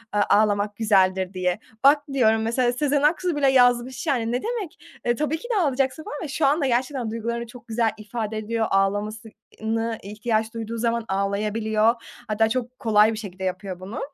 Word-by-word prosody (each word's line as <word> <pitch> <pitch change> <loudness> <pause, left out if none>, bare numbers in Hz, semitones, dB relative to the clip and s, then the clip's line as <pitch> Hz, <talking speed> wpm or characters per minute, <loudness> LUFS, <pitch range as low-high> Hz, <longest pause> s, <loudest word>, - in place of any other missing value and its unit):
eee, 205 - +3
”Ağlamak 205 0 +2
güzeldir” 190 -4 +2
diye. 180 +1 -1 0.2
Bak 290 +2 +6
diyorum, 225 -4 +3
mesela, 240 +2 +1
Sezen 285 +2 +1
Aksu 335 +3 +2
bile 280 -2 +3
yazmış, 245 +2 +3
yani, 235 -5 +1
ne 245 +1 -1
demek? 445 -8 -4 0.3
E, 240 0 +1
tabii 300 +4 -1
ki 480 - -10
de 400 - +3
ağlayacaksın 270 -1 0
falan 295 - -6
ve - - -4
şu 285 +2 0
anda 285 +2 +2
gerçekten 255 -1 -1
duygularını 235 +1 -3
çok 245 +1 -13
güzel 225 -1 +1
ifade 215 0 -4
ediyor, 220 +1 -1
ağlaması 205 +3 0 0.3
ııı, 220 +1 -1
nı 225 0 -1
ihtiyaç 220 +2 -2
duyduğu 230 0 -5
zaman 230 0 0
ağlayabiliyor. 215 +3 +1 0.3
Hatta 220 0 +2
çok 250 +1 -3
kolay 215 -1 +4
bir - - -5
şekilde 190 -3 -7
yapıyor 185 0 -4
bunu. 190 +4 -6
225 Hz, 185 wpm, -24 LUFS, 210-255 Hz, 0.3 s, Bak